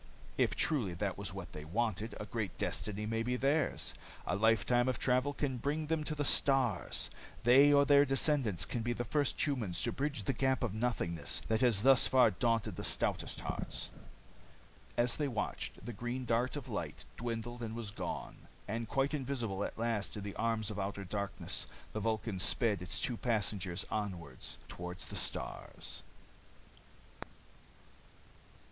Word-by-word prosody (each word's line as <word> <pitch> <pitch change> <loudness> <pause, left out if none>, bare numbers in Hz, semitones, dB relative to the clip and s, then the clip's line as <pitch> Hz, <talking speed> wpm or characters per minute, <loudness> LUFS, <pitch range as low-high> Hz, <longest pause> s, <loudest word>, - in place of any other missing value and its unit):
If - - +2
truly 115 - +1
that 95 +2 -1
was 100 -1 -3
what 95 -2 -7
they 75 - -6
wanted, 110 +6 -1
a 105 - -4
great 105 -4 -3
destiny 105 0 -1
may 115 +1 -1
be 125 +2 0
theirs. 140 - +1 0.3
A 90 - 0
lifetime 115 +4 +3
of 130 - +1
travel 130 +2 +2
can 140 -3 -2
bring 150 +5 -1
them 160 0 0
to 155 - -2
the 145 -1 -1
stars. 130 -9 +3 0.3
They 135 +5 +7
or 140 0 +6
their 140 0 +7
descendants 135 - +2
can 120 - -3
be 120 +1 0
the 120 - -2
first 145 +3 +1
humans 120 - -1
to 120 - +1
bridge 140 -5 -2
the 135 - 0
gap 130 +1 +1
of 115 -5 -1
nothingness 90 - -1
that 110 0 +2
has 115 -5 +4
thus 135 -1 +7
far 130 -4 +5
daunted 115 +2 0
the - - -4
stoutest - - +1
hearts." - - -4 1.1
As 120 0 +3
they 150 - 0
watched, 105 -4 -4
the 120 - -4
green 120 +4 -3
dart 120 +3 +1
of 145 -4 -5
light - - -4
dwindled 120 +1 -4
and 115 -1 -4
was 115 -3 -4
gone. - - -6 0.2
And 115 +1 -3
quite 135 +2 +1
invisible 125 -8 -1
at - - -4
last 115 -3 -1
in 105 - -5
the 100 -1 -5
arms 115 -2 0
of 105 - -5
outer 100 0 -3
darkness, 100 +1 -2 0.3
the 110 - -2
Vulcan 110 -2 -1
sped 105 0 +3
its 90 - 0
two 120 - 0
passengers 100 -6 0
onward 90 -10 -3 0.3
toward 90 0 -6
the - - -7
stars. - - -3
115 Hz, 165 wpm, -34 LUFS, 100-130 Hz, 1.1 s, They